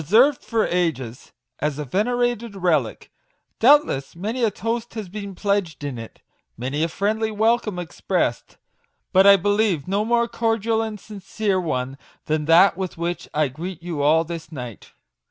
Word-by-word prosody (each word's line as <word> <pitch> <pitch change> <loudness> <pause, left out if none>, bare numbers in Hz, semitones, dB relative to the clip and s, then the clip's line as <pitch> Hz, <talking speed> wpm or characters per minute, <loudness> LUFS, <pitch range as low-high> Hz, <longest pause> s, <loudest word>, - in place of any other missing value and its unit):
51 155 - -12
served 275 +2 +4
for 225 -2 0
ages 135 -9 -2 0.3
as 150 -1 -1
a 150 - -4
venerated 235 - 0
relic: 160 - 0 0.5
doubtless 250 - +4
many 220 +8 -3
a 225 - +4
toast 230 +3 -4
has 215 -3 -5
been 200 0 -7
pledged 200 -6 -1
in 135 -5 -4
it 115 - -11 0.3
many 130 +6 -2
a 165 - +2
friendly 215 +6 -1
welcome 220 -1 +1
expressed; 175 -4 -2 0.6
but 190 +1 +6
I 200 - +10
believe 205 -5 +1
no 200 +3 +1
more 235 +1 +2
cordial 225 -1 0
and 220 -2 -4
sincere 200 -1 -2
one 135 -4 -3 0.3
than 155 -1 -1
that 170 +4 +6
with 185 -2 -5
which 170 +1 -3
I 155 -1 +1
greet 170 +5 -7
you 170 -4 -3
all 155 +3 +4
this 165 -1 -7
night. 125 -8 -8
190 Hz, 160 wpm, -22 LUFS, 155-220 Hz, 0.6 s, I